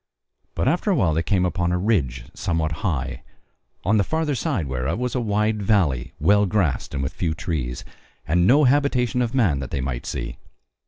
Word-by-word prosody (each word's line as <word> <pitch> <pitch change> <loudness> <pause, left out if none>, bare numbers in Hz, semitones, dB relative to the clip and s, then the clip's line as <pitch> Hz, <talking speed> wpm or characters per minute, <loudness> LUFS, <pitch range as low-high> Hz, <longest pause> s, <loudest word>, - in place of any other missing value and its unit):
But - - 0
after 175 +8 +1
a 195 - +3
while 90 - +2
they 80 - +1
came 90 0 +1
upon 90 -1 0
a 90 - +1
ridge 75 - 0
somewhat 80 -2 -1
high, 65 - -2 0.6
on 110 +3 +3
the 100 - +3
further 160 - -1
side 130 - -1
whereof 65 +6 -2
was 125 0 -2
a 125 - 0
wide 105 0 0
valley 85 - +1
well 105 0 +4
grassed 90 - 0
and 70 - -1
with 65 - -3
few 80 -2 -2
trees, 75 -8 -3 0.4
and 85 +3 +3
no 145 +6 +6
habitation 125 -3 +2
of 120 +1 -1
man 95 - +2
that 70 - -5
they 70 - -3
might 65 -2 -3
see. - - -4
90 Hz, 195 wpm, -23 LUFS, 70-115 Hz, 0.6 s, no